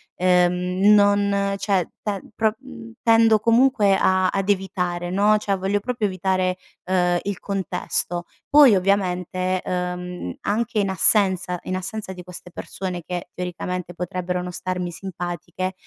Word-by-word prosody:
uhm, 180 0 +2 0.2
non 200 -1 +3
cioè, 195 -3 0
te 200 -3 -3
pro 220 0 +1
mhmm, 235 -4 -12
tendo 225 -1 +5
comunque 230 -3 +4
a 185 -1 +2
ad 195 0 -2
evitare 180 -3 -1
no, 205 +2 +4
cioè, 200 -2 -1
voglio 195 +2 -1
proprio 235 -1 -2
evitare, 185 0 -1 0.3
uhm, 180 -1 +1
il 200 -2 -4
contesto. 180 -2 -2 0.3
Poi 280 -7 +7
ovviamente, 185 -1 0
ehm, 180 - -4
anche 225 +2 -1
in 195 -1 +1
assenza 190 -1 +3
in 185 - -3
assenza 190 +2 -5
di 180 - -10
queste 180 0 -10
persone, 180 0 -6
che 180 -1 -5
teoricamente, 180 0 -4
potrebbero 180 +1 -3
non 180 0 -5
starmi 180 0 -3
simpatiche, 180 +1 -5
185 Hz, 135 wpm, -22 LUFS, 180-205 Hz, 0.3 s, Poi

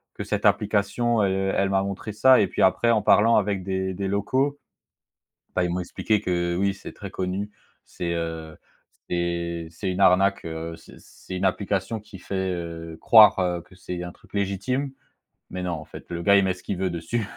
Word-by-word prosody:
que - - -5
cette - - -2
application, 105 +2 +2
elle 95 0 0
elle 100 - +2
m'a 95 0 +2
montré 100 +2 -5
ça 130 +5 +6
et 100 - +2
puis - - -3
après 95 +5 +3
en 110 -2 +3
parlant 115 +3 +5
avec 100 -2 +1
des 95 0 -2
des 95 +1 -3
locaux, 130 +9 0 1.0
bah, 90 - +2
ils 90 - -1
m'ont 90 - -1
expliqué 105 +4 -1
que, 85 -3 -1
oui 100 +1 +1
c'est 100 - -10
très 100 -2 -9
connu. 95 +3 -3 0.4
C'est, 85 -1 -4
heu, 80 -1 -4 0.5
c'est 85 -1 -2
c'est 95 +3 -4
une 90 - -3
arnaque, 95 +1 +4
heu, 80 0 -5
c'est, 80 - -16
c'est 95 - -10
une 90 - -2
application 100 +2 -1
qui 100 -2 -13
fait, 95 0 -3
heu, 85 -2 -6
croire 90 -6 +6
que 95 - -19
c'est 90 -1 -6
un 90 0 -6
truc - - -23
légitime. 100 +8 -1 0.6
Mais 90 0 -5
non, 90 - -2
en 80 -2 -5
fait, - - -11
le 85 0 -4
gars, 100 +2 +5
il 100 - +4
met 95 - +2
ce 90 - -16
qu'il 100 - -3
veut 95 -1 0
dessus. 100 +6 -3
95 Hz, 200 wpm, -25 LUFS, 85-100 Hz, 1.0 s, ça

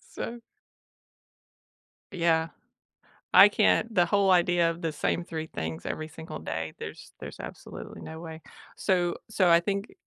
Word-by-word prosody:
So. 235 +1 -5 1.7
Yeah, 165 -2 +2 0.8
I 200 - +10
can't 220 +2 +2
the 175 -3 +4
whole 200 +1 +3
idea 175 -2 +4
of 165 +1 -7
the 160 -1 -1
same 170 +3 -1
3 160 -2 -5
things 80 - -5
every 155 0 -4
single 160 0 -8
day, 80 -1 -4
there's - - -9
there's - - -9
absolutely - - -9
no 160 0 -8
way. 160 -1 -9 0.3
So 175 -2 +1
so 190 -4 +2
I 170 0 +7
think 200 +3 -3
170 Hz, 145 wpm, -28 LUFS, 160-185 Hz, 1.7 s, I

